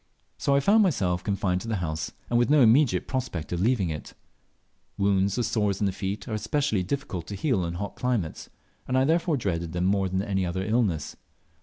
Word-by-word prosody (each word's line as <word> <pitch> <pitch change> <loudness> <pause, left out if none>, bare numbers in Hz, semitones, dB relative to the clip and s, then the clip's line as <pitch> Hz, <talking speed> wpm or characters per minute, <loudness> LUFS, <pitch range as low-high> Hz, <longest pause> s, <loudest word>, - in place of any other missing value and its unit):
So 140 - +2
I 140 - +3
found 210 +9 +5
myself 95 - +1
confined 95 -3 0
to - - -7
the 115 - -1
house, 80 -5 -3 0.2
and 120 - +2
with 120 - +2
no 150 -1 +5
immediate 115 - +4
prospect 125 - -3
of 85 - -1
leaving 105 -6 +2
it. 75 - -7 0.8
Wounds 100 0 +2
or 120 - +1
sores 105 -4 0
in 105 - +1
the 95 - +1
feet 100 +3 -4
are 115 - -4
especially 135 -1 0
difficult 95 -5 -4
to 100 - -5
heal 100 - 0
in 85 0 -4
hot 100 +3 -5
climates, 120 -10 -2 0.4
and 130 - +1
I 130 - +4
therefore 165 0 +2
dreaded 85 -7 -2
them 90 +1 0
more 95 0 +2
than 95 +1 -1
any 95 -2 -1
other 95 +2 -2
illness. 105 -8 0
100 Hz, 205 wpm, -26 LUFS, 90-125 Hz, 0.8 s, found